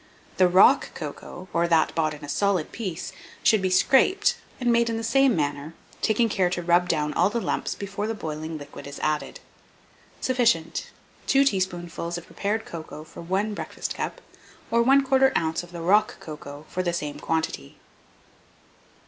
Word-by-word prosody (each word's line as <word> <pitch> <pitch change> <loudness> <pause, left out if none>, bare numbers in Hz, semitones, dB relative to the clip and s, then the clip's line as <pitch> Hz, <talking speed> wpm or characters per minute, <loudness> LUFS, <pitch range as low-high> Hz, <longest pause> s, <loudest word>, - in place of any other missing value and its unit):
The 185 - +6
rock 180 +2 +5
cocoa, 185 +1 -8
or 170 +1 +2
that 165 -2 +3
bought 155 -2 0
in 145 0 -10
a - - -10
solid 185 +2 0
piece, 190 -3 -5 0.3
should 220 -3 +4
be 190 - +1
scraped, 275 - +4 0.2
and 245 -2 +2
made 235 0 +3
in 225 - -1
the 225 - -4
same 265 +1 +3
manner, 145 +1 -2 0.3
taking 225 +2 +2
care 190 -4 +1
to 175 -1 -3
rub 175 +1 +3
down 150 -2 0
all 180 +3 +3
the 235 - -1
lumps - - -2
before 200 +1 -4
the 225 - -2
boiling 155 -3 -5
liquid 145 -1 -10
is 140 - -8
added. 155 -1 -1 0.8
Sufficient 235 -11 +1 0.4
2 275 0 +4
teaspoonfuls 175 -5 -2
of 175 - -9
prepared 210 +2 -2
cocoa 160 -2 -8
for 155 - -11
1 195 +5 -1
breakfast - - -5
cup, - - -4 0.5
or 235 0 +4
1/4 265 0 +4
oz. 160 -1 0
of 175 0 -13
the 170 -1 -7
rock 210 +7 +3
cocoa 150 -1 -9
for 185 - -2
the 175 -1 -1
same 150 -4 -4
quantity. 160 - -3
180 Hz, 170 wpm, -25 LUFS, 160-225 Hz, 0.8 s, The